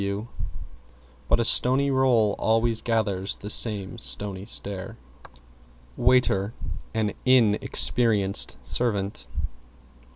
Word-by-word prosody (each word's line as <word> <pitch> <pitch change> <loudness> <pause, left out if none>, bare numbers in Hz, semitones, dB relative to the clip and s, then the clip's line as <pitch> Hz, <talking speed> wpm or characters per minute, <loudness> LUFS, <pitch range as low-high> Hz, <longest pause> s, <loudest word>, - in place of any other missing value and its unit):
W 100 +3 -4 1.0
But - - +3
a 115 - +1
stony 135 +4 +2
roll 125 -6 +2
always 115 0 +1
gathers 105 -5 -1
the 105 - -5
stony 100 -2 -2
stare. 100 +2 -2 1.0
=WAITER= 115 -4 +2 0.4
An 110 -2 0
Inn 120 -5 +4
experienced 100 - +3
servant. 100 - -1
105 Hz, 90 wpm, -25 LUFS, 100-120 Hz, 1.0 s, Inn